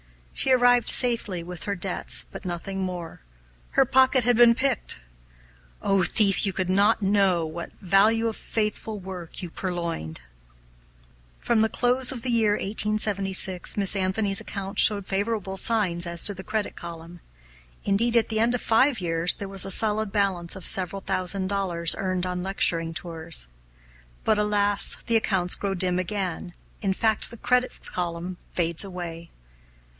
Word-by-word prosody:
She 265 - +1
arrived 245 -2 +4
safely 225 -8 +7
with 175 -1 -9
her 200 - -3
debts, 180 0 0
but - - -10
nothing 185 +2 -6
more 180 - -6 0.5
her - - +3
pocket 260 0 +3
had 245 +1 +2
been 235 0 +5
picked! 260 - -1 0.8
Oh, 195 -1 +1
thief, 195 +2 +2
could - - +5
you 195 - -2 0.2
but 205 +2 +2
know 190 -4 +1
what 170 +2 -8
value 210 +5 +2
of 225 - -4
faithful 215 0 -4
work 185 -3 -8
you 175 - -7
purloined! 170 - -5 1.2
From 235 -2 0
the 220 - +1
close 250 +2 +1
of 245 -4 -7
the 250 - -2
year 220 -3 +2
1876 200 -3 0
Miss 200 0 +3
Anthony's 195 +2 -1
accounts 200 -1 -2
showed 200 -2 +3
favorable 200 -1 -3
signs 185 -6 0
as 170 -1 +1
to 205 - +1
the 190 0 -10
credit 215 +1 -4
column. 170 0 -10 0.6
Indeed, 230 +4 +1
at 230 - +1
the 220 -1 -1
end 235 +2 +1
of 245 - -4
five 245 +2 +2
years 170 -1 -1
there 200 - -7
was 195 -1 0
a - - -5
solid 215 +1 +1
balance 195 -5 -1
of 190 - -8
several 190 +1 +4
thousand 185 +1 -2
dollars 185 -4 0
earned 185 -1 -2
on 180 0 -4
lecturing 165 -3 -1
tours. 160 - -3 0.8
But 215 - +1
alas! 205 -1 +4
the 230 - -1
accounts 190 -5 0
grow 195 -1 -3
dim 180 0 0
again 185 -2 -5 0.3
in 195 -3 -1
fact 220 +2 +2
the 235 - -12
credit 250 +2 0
column 175 0 -5 0.2
fades 170 0 -1
away. 175 -3 -8
195 Hz, 160 wpm, -24 LUFS, 180-220 Hz, 1.2 s, safely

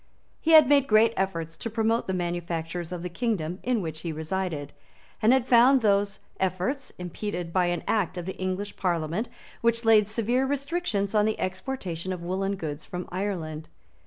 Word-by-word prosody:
He 325 - +2
had 310 -4 +9
made 280 -1 +4
great 220 0 +5
efforts 165 -4 -2
to 230 - -4
promote 225 +1 0
the 190 - -1
manufactures 175 -1 -3
of 175 -1 -5
the - - -2
kingdom 180 -3 -2
in 240 -5 0
which 160 -1 -5
he 165 0 -4
resided; 160 -2 -3 0.5
and 220 - +5
he - - +7
had 260 -3 +1
found 250 +2 +6
those 200 -1 +1 0.2
efforts 190 - -1
impeded 180 -1 -5
by 180 -2 +3
an 175 -2 -1
Act 200 -5 0
of 175 - -4
the 190 - -4
English 185 +2 -3
Parliament 175 +4 -1 0.3
which 235 0 +1
laid 215 -2 +6
severe 235 +4 +1
restrictions 280 - -1
on 210 -1 +4
the 220 - -1
exportation 185 -3 -4
of 180 -2 -5
woollen 195 +3 -1
goods 155 -5 -5
from 180 0 -6
Ireland. 170 -5 -3
190 Hz, 180 wpm, -27 LUFS, 175-230 Hz, 0.5 s, had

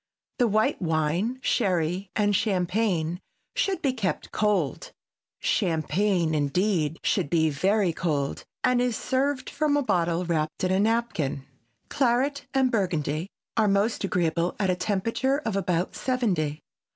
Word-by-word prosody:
The 245 - +4
white 215 0 +1
wine, 165 +8 0
sherry 185 -3 0
and 205 -1 +2
champagne 180 -4 0 0.4
should 390 -1 0
be 270 -3 +2
kept 205 -7 -3
cold; 195 - 0 0.5
champagne, 175 +1 +1
indeed, 155 +2 +1
should - - +1
be 160 -1 +2
very 190 +5 +1
cold 150 -5 -2 0.2
and 250 -1 +3
is 245 -2 0
served 265 +1 -1
from 295 -1 +1
a 290 - +1
bottle 175 -5 +1
wrapped 155 -2 -1
in 185 - +2
a 190 - +2
napkin. 210 - 0 0.4
Claret 270 +2 +1
and 265 -2 +2
Burgundy 175 - -1 0.3
are 220 -2 +3
most 200 +3 +1
agreeable 170 -2 0
at 195 -3 +1
a - - +1
temperature 230 +8 0
of 225 -9 -3
about 180 -2 -1
seventy. 185 - -1
190 Hz, 135 wpm, -26 LUFS, 165-230 Hz, 0.5 s, The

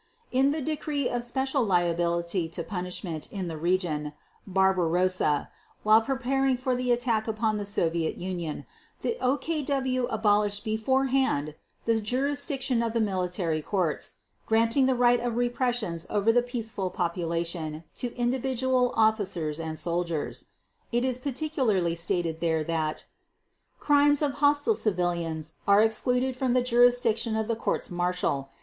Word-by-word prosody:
_ - - -39 0.3
In 265 +2 +3
the 305 +2 -1
decree 295 -2 -2
of 245 0 -1
special 265 +3 0
liability 170 -2 0
to 170 +1 -5
punishment 180 -3 -5
in 190 -3 -4
the 165 - -4
region 160 -3 -1 0.3
"Barbarossa" 185 -4 +2 0.3
while 215 +1 +6
preparing 270 +1 0
for 255 +1 -1
the 250 0 0
attack 235 -2 +1
upon 220 -1 0
the 205 - -3
Soviet 170 -5 0
Union, 175 -4 -4 0.4
the 465 - -1
OKW 265 -2 0
abolished 205 -2 +1
beforehand 255 - +1 0.3
the 225 -1 +2
jurisdiction 270 +1 0
of 230 -1 -1
the 230 - +1
military 180 -5 -1
courts, 175 -2 -1 0.3
granting 230 +4 +3
the 260 - +2
right 245 0 +4
of 240 -1 -2
repressions 240 -8 -1
over 210 +2 +3
the 245 +1 +4
peaceful 225 -6 -3
population 170 -2 -3
to 245 -1 -5
individual 255 0 0
officers 195 -8 +1
and 160 -1 -4
soldiers. 170 -2 -2 0.5
It 240 +1 +1
is 255 -1 -1
particularly 255 - 0
stated 170 -1 -2
there 160 -2 +1
that: 155 -1 -2 0.7
"Crimes 290 0 +4
of 290 - +2
hostile 290 +8 +4
civilians 170 - -1
are 200 +1 +6
excluded 250 +4 0
from 255 -1 0
the 250 -1 +3
jurisdiction 240 -2 +3
of 220 -1 -1
the 230 - 0
courts 225 - -2
martial 175 -6 -1
220 Hz, 135 wpm, -27 LUFS, 175-250 Hz, 0.7 s, while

